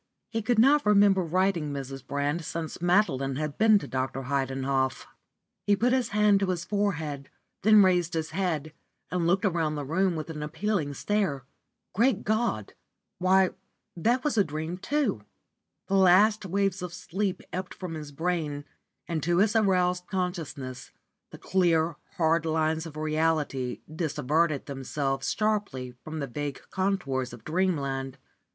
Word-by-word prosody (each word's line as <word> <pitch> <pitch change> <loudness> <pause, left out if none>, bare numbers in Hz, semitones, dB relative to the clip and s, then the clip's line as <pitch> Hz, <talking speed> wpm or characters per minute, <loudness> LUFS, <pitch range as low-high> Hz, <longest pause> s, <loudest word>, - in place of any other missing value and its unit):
He 225 - -1
could 230 +2 +1
not 280 +6 +5
remember 200 -2 +5
writing 175 -2 0
Mrs. 135 -1 -6
Brand 145 +4 -2
since 165 +1 -5
Madeline 170 -8 +2
had 150 0 -4
been 215 -1 +6
to - - -5
Dr. 130 +1 -3
Heidenhoff. 135 0 -1 0.6
He 205 - +5
put 245 +5 +2
his 260 -2 +1
hand 210 -1 +4
to 195 - 0
his 175 -2 -2
forehead, 160 -9 -2 0.3
then 215 0 +7
raised 180 -2 +2
his 160 0 -2
head 160 -5 -2 0.4
and 175 -1 0
looked 190 +4 +2
around 165 -5 0
the 145 -1 -4
room 180 +5 +1
with 155 +1 -5
an 150 -2 -6
appealing 155 -1 -2
stare. 190 -8 -1 0.5
Great 225 0 +2
God! 215 - -1 0.5
why, 185 +1 +4 0.4
that 235 +9 +1
was 290 -7 +1
a - - +6
dream 160 +2 -5
too! 260 - 0 0.6
The - - -4
last 195 +3 +5
waves 195 0 0
of 180 -1 -5
sleep 190 +1 -3
ebbed 185 0 -4
from 180 -3 -6
his 150 -2 -7
brain 155 -2 -2 0.4
and 165 -2 -2
to 175 +2 +1
his 210 +4 +3
aroused 180 -4 +2
consciousness 160 -9 -4 0.4
the - - -11
clear, 170 -3 +2 0.2
hard 165 -1 +3
lines 160 0 0
of 155 -1 -10
reality 155 -4 0
dissevered 155 -1 0
themselves 135 0 -2
sharply 205 - -1
from 155 0 -6
the 145 - -2
vague 140 +2 -4
contours 140 -11 -1
of 115 -2 -11
dreamland. 140 -6 -1
170 Hz, 150 wpm, -27 LUFS, 145-195 Hz, 0.6 s, then